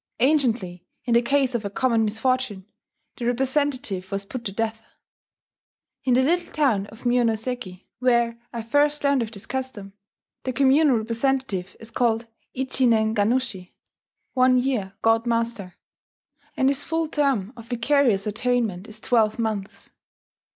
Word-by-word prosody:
Anciently, 230 - +1 0.2
in 240 - +1
the 235 - +5
case 265 +1 +1
of 235 -2 -1
a 200 - -3
common 230 +1 +1
misfortune, 220 -2 -1 0.5
the 240 - -4
representative 255 -6 -1
was 195 0 -2
put 235 +4 -6
to 200 - -2
death. 225 +2 -2 1.2
In 255 -2 +3
the 260 - +4
little 345 +5 +1
town 230 -10 +1
of 225 +4 -15
Mionoseki, 235 -5 -1
where 235 -2 +2
I 235 -2 -5
first 290 +5 +2
learned 280 -2 +3
of 225 - -3
this 200 -3 -9
custom, 255 -7 -5 0.5
the 255 - -2
communal 275 +1 +4
representative 230 -4 -1
is 225 +1 -10
called 230 -1 +1 0.3
ichi 260 0 +1
nen 220 -1 +3
gannushi 210 -3 0 0.6
("one 255 -1 +4
year 245 -7 -1
god 225 +1 +3
master"); 230 -5 -1 0.8
and 265 - +3
his 280 0 +1
full 325 +1 -1
term 270 -9 0
of 230 -1 -12
vicarious 245 -3 +2
atonement 220 -3 -1
is 215 0 -8
twelve 220 -3 +2
months. 215 -4 -4
235 Hz, 145 wpm, -24 LUFS, 215-260 Hz, 1.2 s, the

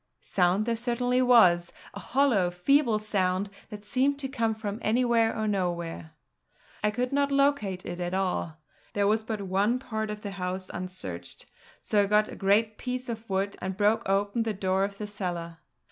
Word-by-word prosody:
Sound 185 +3 +2
there 235 0 0
certainly 245 +2 0
was, 185 -9 +5 0.2
a - - -7
hollow, 250 -10 +2
feeble 230 +6 +2
sound 200 -2 -1 0.2
that 210 -1 -9
seemed 265 +6 +1
to 275 -1 -3
come 230 -5 -1
from 215 -1 -5
anywhere, 230 0 +2
or 220 0 -1
nowhere. 170 - -2 0.7
I 210 - +4
could 250 +5 -2
not 285 0 +2
locate 275 -10 +1
it 175 0 -5
at 175 +1 -2
all. 180 -4 -1 0.4
There 200 0 +1
was 215 +2 +2
but 215 -2 -4
one 200 +5 +1
part 220 -4 -4
of 210 0 -5
the 205 - -5
house 185 -1 -4
unsearched, 175 - -7 0.4
so 210 - +2
I 200 - +1
got 210 +1 +3
a - - -8
great 210 +2 +2
piece 250 0 -4
of 225 -1 -6
wood 195 +1 -1
and 190 0 -4
broke 215 +1 +2
open 200 +4 +1
the 225 -2 -1
door 190 0 +1
of 200 0 -7
the 210 - -4
cellar. 175 -5 -5
210 Hz, 180 wpm, -28 LUFS, 185-230 Hz, 0.7 s, was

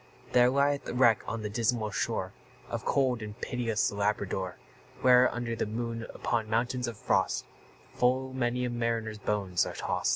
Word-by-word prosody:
There 125 0 +6
lieth 140 +1 +1
a - - -4
wreck 120 -4 +4
on 110 0 -3
the 105 - -2
dismal 115 -1 0
shore - - -2 0.4
Of - - -4
cold 130 -4 +2
and 105 0 -7
pitiless 115 -3 0
Labrador; 100 -3 -1 0.4
Where, 125 0 +6
under 120 -1 -3
the 110 - -2
moon, 115 +1 -4
upon 110 -2 -1
mounts 120 +2 0
of 115 -3 -5
frost, - - +1 0.5
Full 130 +1 +1
many 125 -1 0
a 125 - -2
mariner's 115 -2 -2
bones 100 -4 0
are - - -4
tost. - - -1
115 Hz, 165 wpm, -29 LUFS, 110-125 Hz, 0.5 s, There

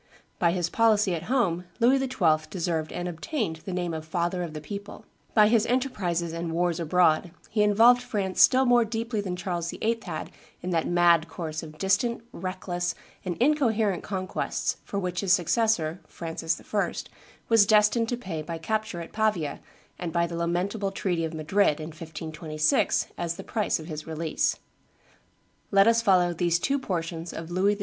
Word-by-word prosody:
By 170 -1 +3
his 175 -1 0
policy 215 -1 +3
at 170 0 -4
home 185 -10 +1
Louis 250 +3 +5
XII. 170 -13 +1
deserved 165 -4 -2
and 175 - -4
obtained 175 - -3
the 185 - -8
name 175 -2 -2
of 160 -1 -4
Father 175 +2 -1
of 165 -3 -5
the - - -3
People; 200 +6 -8 0.3
by 210 -2 +7
his 225 0 +3
enterprises 185 -10 -1
and 165 0 -3
wars 175 0 0
abroad 170 0 +3 0.2
he 215 - +2
involved 225 +4 +6
France 200 -6 -1
still 260 +1 +6
more 245 -1 +5
deeply 225 0 -2
than 185 -3 -3
Charles 175 -2 -3
VIII. 230 +5 -1
had - - -5 0.3
in 180 - -2
that 165 -2 +1
mad 170 -2 +4
course 160 -2 -5
of 155 -1 -10
distant, 210 +6 +1
reckless, 180 -1 -3 0.3
and 180 -3 -3
incoherent 230 - +2
conquests 185 -2 -2
for 200 - -5
which 180 -2 -2
his 190 -3 +3
successor, 175 -3 +1
Francis 165 -1 -3
I., 205 -1 -1 0.5
was 225 -3 +5
destined 215 +2 +4
to 245 - -1
pay 180 -9 -5
by 165 +2 -5
capture 215 0 -2
at 165 - -10
Pavia 210 -10 0 0.4
and 175 -2 -3
by 170 +1 +2
the 170 0 -5
lamentable 180 +5 -1
treaty 180 -4 -1
of 160 0 -5
Madrid, 155 +1 +2
in 155 +1 -5
1526, 155 -1 -1
as 170 -1 -2
the - - -8
price 215 -3 0
of 155 - -8
his 155 -2 -7
release. 160 0 -1 1.1
Let 195 -1 +5
us 230 0 +4
follow 180 -5 +3
these 170 0 +1
two 275 +10 0
portions 170 -6 -4
of 165 +1 -7
Louis 195 +3 +2
XII. - - -14
180 Hz, 175 wpm, -27 LUFS, 165-215 Hz, 1.1 s, by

